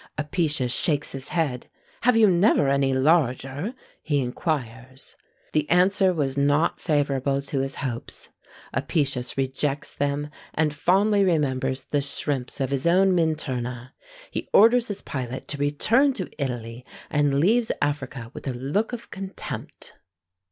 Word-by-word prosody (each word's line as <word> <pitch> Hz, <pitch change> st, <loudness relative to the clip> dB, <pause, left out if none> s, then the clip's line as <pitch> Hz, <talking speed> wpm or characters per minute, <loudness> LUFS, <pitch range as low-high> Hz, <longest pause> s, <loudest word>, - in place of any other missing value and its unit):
Apicius 150 Hz, -4 st, 0 dB
shakes 145 Hz, 0 st, +1 dB
his 135 Hz, -1 st, -6 dB
head: 145 Hz, -8 st, -1 dB, 0.3 s
"Have 245 Hz, -1 st, +4 dB
you 225 Hz, -, +7 dB
never 175 Hz, -6 st, +4 dB
any 140 Hz, -1 st, +2 dB
larger?" 135 Hz, -, +1 dB, 0.3 s
he 145 Hz, -2 st, 0 dB
inquires. 130 Hz, -1 st, -4 dB, 0.4 s
The 150 Hz, -1 st, +1 dB
answer 185 Hz, +2 st, +4 dB
was 145 Hz, -6 st, -1 dB
not 145 Hz, +3 st, +2 dB
favourable 140 Hz, -3 st, 0 dB
to 140 Hz, 0 st, -2 dB
his 135 Hz, 0 st, -2 dB
hopes. 120 Hz, -4 st, -5 dB, 0.4 s
Apicius 135 Hz, -3 st, -1 dB
rejects 135 Hz, +2 st, -2 dB
them, 145 Hz, +1 st, -2 dB, 0.2 s
and 155 Hz, -1 st, +1 dB
fondly 200 Hz, +6 st, +3 dB
remembers 135 Hz, -6 st, 0 dB
the 145 Hz, +1 st, -1 dB
shrimps 140 Hz, -1 st, -2 dB
of 135 Hz, -1 st, -1 dB
his 140 Hz, +3 st, 0 dB
own 190 Hz, +3 st, +5 dB
Minturna. 130 Hz, -7 st, -2 dB, 0.4 s
He -, -, -4 dB
orders 230 Hz, +3 st, +6 dB
his 205 Hz, -2 st, -5 dB
pilot 130 Hz, -1 st, -5 dB
to 145 Hz, -, -4 dB
return 225 Hz, -, +3 dB
to 185 Hz, -7 st, -5 dB
Italy, 120 Hz, -2 st, -5 dB, 0.3 s
and 145 Hz, -2 st, +2 dB
leaves 220 Hz, +8 st, +3 dB
Africa 135 Hz, -5 st, -3 dB
with -, -, -8 dB
a 130 Hz, -, -1 dB
look 145 Hz, -, -1 dB
of 235 Hz, -1 st, -7 dB
contempt. 195 Hz, 0 st, -7 dB
145 Hz, 135 wpm, -25 LUFS, 130-175 Hz, 0.4 s, you